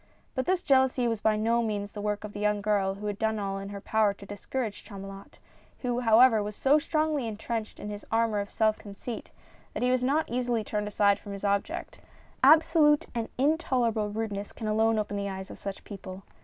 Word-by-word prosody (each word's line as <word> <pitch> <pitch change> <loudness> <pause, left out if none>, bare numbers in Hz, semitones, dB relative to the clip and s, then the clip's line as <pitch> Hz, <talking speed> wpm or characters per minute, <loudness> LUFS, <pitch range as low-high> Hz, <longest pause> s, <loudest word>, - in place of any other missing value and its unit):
— - - -37
But 260 - -2
this 370 0 +1
jealousy 260 -3 +3
was 225 -2 -1
by 220 -1 +3
no 230 +2 +2
means 205 -3 -3
the 210 - -5
work 210 0 -2
of 210 -1 -7
the 205 - -6
young 210 0 +1
girl 200 -2 +1
who 205 +1 -8
had 205 -1 -3
done 220 -1 +1
all 195 -1 -2
in 195 0 -6
her 200 0 -6
power 210 0 +1
to 200 - -12
discourage 205 +2 -4
Chamulot, 195 -1 -10 0.4
who 245 -1 -1
however, 230 -1 +6
was 210 0 -4
so 285 +6 +4
strongly 305 -4 0
intrenched 220 0 -4
in 210 - -5
his 205 0 -7
armor 225 -2 +2
of 200 0 -4
self 215 -1 +1
conceit 210 +3 -7 0.5
that - - -2
he 250 - +3
was 255 -1 +2
not 295 +5 +1
easily 240 -2 -1
turned 210 0 -2
aside 205 -1 +3
from 205 - -8
his 200 - -8
object 200 0 -1 0.2
— - - -31
absolute 305 0 +6
and 230 -2 -3
intolerable 250 -7 +1
rudeness 205 -1 -4
can 225 - -7
alone 220 +1 +2
open 205 -1 -2
the 200 0 -2
eyes 190 0 -6
of - - -10
such 195 -1 -6
people. 195 -1 -9
215 Hz, 215 wpm, -28 LUFS, 205-245 Hz, 0.5 s, however